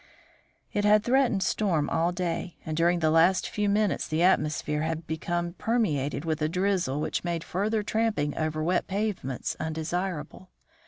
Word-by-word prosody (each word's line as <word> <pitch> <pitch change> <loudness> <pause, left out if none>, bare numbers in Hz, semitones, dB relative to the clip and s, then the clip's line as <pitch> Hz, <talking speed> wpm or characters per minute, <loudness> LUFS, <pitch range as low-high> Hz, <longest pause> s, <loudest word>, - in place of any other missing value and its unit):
It 205 - 0
had 210 0 +5
threatened 245 -5 +2
storm 175 -9 +1
all 165 +2 +1
day, 175 -1 -3
and 155 - -3
during 170 +2 +2
the 155 -1 +3
last 170 +4 +4
few 210 -1 -1
minutes 205 -1 +1
the 155 +2 0
atmosphere 150 -4 +2
had 160 +1 -2
become 170 +2 -2
permeated 170 - -1
with 160 -1 -1
a 155 - +1
drizzle 180 -5 0
which - - -2
made 170 -2 -2
further 210 +4 -1
tramping 210 -10 0
over 155 -1 -1
wet 175 +2 +1
pavements 195 - -2
undesirable. 170 +2 -4
175 Hz, 155 wpm, -27 LUFS, 155-200 Hz, -, had